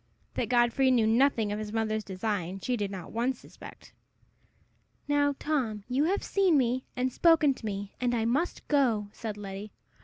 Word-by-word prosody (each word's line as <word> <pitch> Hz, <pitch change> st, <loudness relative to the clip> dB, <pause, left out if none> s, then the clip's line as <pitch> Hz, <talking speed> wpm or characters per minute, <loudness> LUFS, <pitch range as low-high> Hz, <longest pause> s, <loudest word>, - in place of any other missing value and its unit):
That -, -, -2 dB
Godfrey 245 Hz, +2 st, +3 dB
knew 240 Hz, -4 st, +4 dB
nothing 225 Hz, -2 st, +3 dB
of 210 Hz, -, -2 dB
his 215 Hz, -1 st, -5 dB
mother's 220 Hz, -1 st, -1 dB
design, 190 Hz, -2 st, -3 dB
she 250 Hz, +6 st, -1 dB
did 205 Hz, -4 st, -2 dB
not 190 Hz, -4 st, -7 dB
once 245 Hz, +3 st, -1 dB
suspect. -, -, -13 dB, 1.1 s
"Now, 285 Hz, -1 st, +2 dB
Tom, 245 Hz, -9 st, -1 dB
you 260 Hz, +4 st, +1 dB
have 390 Hz, +5 st, 0 dB
seen 380 Hz, -6 st, +3 dB
me, 255 Hz, 0 st, 0 dB
and 255 Hz, 0 st, -1 dB
spoken 320 Hz, -4 st, +4 dB
to 250 Hz, -, -11 dB
me, 200 Hz, -1 st, -5 dB
and 245 Hz, -1 st, +1 dB
I 225 Hz, -1 st, 0 dB
must 285 Hz, +10 st, -1 dB
go," 235 Hz, -8 st, +2 dB
said 215 Hz, -2 st, -6 dB
Letty. 200 Hz, +1 st, -7 dB
235 Hz, 175 wpm, -29 LUFS, 210-270 Hz, 1.1 s, knew